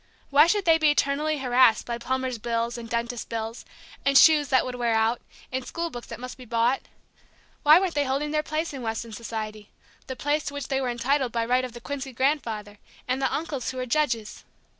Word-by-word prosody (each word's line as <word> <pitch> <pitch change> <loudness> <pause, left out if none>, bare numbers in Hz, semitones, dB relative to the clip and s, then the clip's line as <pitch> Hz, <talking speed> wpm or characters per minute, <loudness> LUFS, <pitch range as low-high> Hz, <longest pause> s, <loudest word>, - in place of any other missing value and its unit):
Why 295 +3 +7
should 405 +2 +1
they 325 -1 +5
be 310 -1 +4
eternally 295 +1 +1
harassed 250 -3 +4
by 235 -1 -4
plumbers' 260 0 -2
bills, 235 +1 -1
and 235 -1 -7
dentists' 235 +1 -2
bills, 225 0 -5 0.4
and 275 0 +4
shoes 300 -1 +7
that 260 -1 +3
would 255 - -4
wear 240 -2 0
out, 225 +2 +1 0.3
and 260 0 -2
school 335 +5 -4
books 240 -3 -8
that - - -8
must 255 +1 -8
be - - -9
bought? 235 +3 +1 0.8
Why 305 +3 +7
weren't 375 -3 -1
they 290 -1 +1
holding 275 +3 -1
their 305 0 +1
place 310 +1 -3
in 270 - -6
Weston 225 0 -4
society, 215 -2 -6 0.4
the 260 - -5
place 290 +3 -1
to 285 - -5
which 285 -2 -5
they 270 -1 0
were 255 - -1
entitled 250 +2 0
by 230 0 -1
right 250 +2 +2
of 250 -2 -5
the 240 - -10
Quincy 270 0 -5
grandfather, 230 -6 -1 0.3
and 255 +1 -1
the - - +1
uncles 290 -5 -3
who 260 - -6
were 255 - -2
judges? 235 -5 -1
255 Hz, 215 wpm, -26 LUFS, 235-285 Hz, 0.8 s, Why